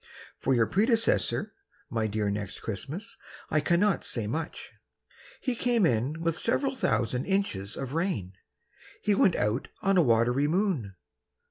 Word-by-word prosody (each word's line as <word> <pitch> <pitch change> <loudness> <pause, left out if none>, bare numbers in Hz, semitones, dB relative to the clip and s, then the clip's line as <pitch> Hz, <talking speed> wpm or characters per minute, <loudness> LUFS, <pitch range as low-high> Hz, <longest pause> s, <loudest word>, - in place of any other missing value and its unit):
For 135 - +2
your 115 -2 +4
predecessor, 225 - +1 0.4
My 115 -2 0
dear 105 -1 -1
Next 100 -1 -4
Christmas, 150 - -5 0.3
I 155 - +3
cannot 175 +6 +2
say 115 -4 -1
much. 155 +9 -4 0.7
He 255 - 0
came 235 -4 +2
in 130 +5 0
with 165 0 0
several 270 +4 +1
thousand 125 - 0
inches 150 - -1
of 135 0 -5
rain; 160 - -1 0.7
He 210 - +3
went 190 -3 +4
out 105 +5 0 0.2
on 195 -1 +3
a - - +7
watery 120 +2 +3
moon. 160 - 0
150 Hz, 140 wpm, -28 LUFS, -, 0.7 s, a